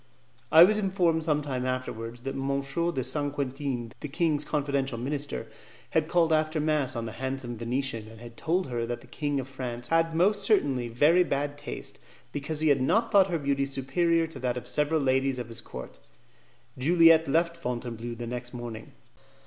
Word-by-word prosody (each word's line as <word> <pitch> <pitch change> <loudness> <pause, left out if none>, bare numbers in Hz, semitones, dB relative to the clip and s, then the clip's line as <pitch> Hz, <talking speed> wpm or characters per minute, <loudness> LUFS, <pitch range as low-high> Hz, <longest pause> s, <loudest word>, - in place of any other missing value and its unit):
I 160 +1 +10
was 215 +4 +4
informed 180 -5 +1
some 150 -2 +1
time 130 -3 -3
afterwards 120 -2 -4
that 135 +1 -4
M. 140 +1 -1 0.3
de 130 -5 -2
Saint 145 0 -1
Quentin, 135 -4 -3
the - - -5
king's 150 0 +1
confidential 140 -4 -1
minister, 140 +4 -3 0.5
had 160 -1 +2
called 165 -2 +3
after 155 0 +1
mass 150 -4 0
on 115 -1 -3
the 110 - -5
handsome 130 0 -4
Venetian, 115 -1 -2
and 110 0 -13
had 120 0 -11
told 175 +7 0
her 120 -3 -3
that 120 0 -4
the - - -15
king 145 -2 -2
of 130 - -5
France 125 -3 -6
had 165 0 +2
most 200 +5 +3
certainly 145 - +2
very 150 +10 +4
bad 145 -2 -2
taste, 145 0 -7 0.3
because 150 +2 -4
he 155 - +3
had 140 -2 +3
not 225 - +2
thought 195 -3 +5
her 170 - 0
beauty 140 -2 0
superior 165 +5 +1
to 160 - -9
that 125 -1 -1
of 125 0 -7
several 150 +3 +1
ladies 135 0 +1
of 120 -2 -5
his 115 - -4
court. 65 0 -9 0.8
Juliette 165 +2 +6
left 170 +4 +2
Fontainebleau 120 -5 -4
the 120 +1 -6
next 125 +1 -6
morning. 115 -2 -7
140 Hz, 185 wpm, -28 LUFS, 125-160 Hz, 0.8 s, I